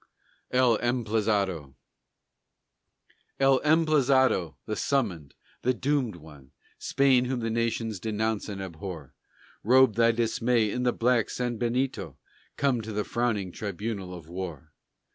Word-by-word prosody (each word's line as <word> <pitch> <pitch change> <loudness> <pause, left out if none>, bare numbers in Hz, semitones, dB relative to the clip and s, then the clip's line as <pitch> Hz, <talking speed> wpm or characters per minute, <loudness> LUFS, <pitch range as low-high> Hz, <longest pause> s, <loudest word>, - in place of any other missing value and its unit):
EL 125 -3 +3
EMPLAZADO 105 - 0 1.6
El 135 -1 +4
Emplazado, 140 - +3
the 110 - -3
Summoned, 100 - -1 0.3
the 130 +1 +1
Doomed 135 -5 0
One, 75 -4 -15 0.3
Spain 130 -2 +3
whom 125 -1 -2
the 115 0 -2
nations 115 -2 -1
denounce 110 +1 -2
and 95 -1 -5
abhor, 85 -5 -8 0.5
Robe 130 +1 +5
thy 115 +2 +4
dismay 115 -1 +1
in 125 - -2
the 125 0 +2
black 120 -1 +2
sanbenito, 125 +2 -2 0.4
Come 135 -4 +1
to 110 0 -7
the 105 0 -1
frowning 110 -6 -1
tribunal 100 -1 -5
of 85 -3 -11
war. 85 -4 -7
115 Hz, 120 wpm, -27 LUFS, 95-125 Hz, 1.6 s, Robe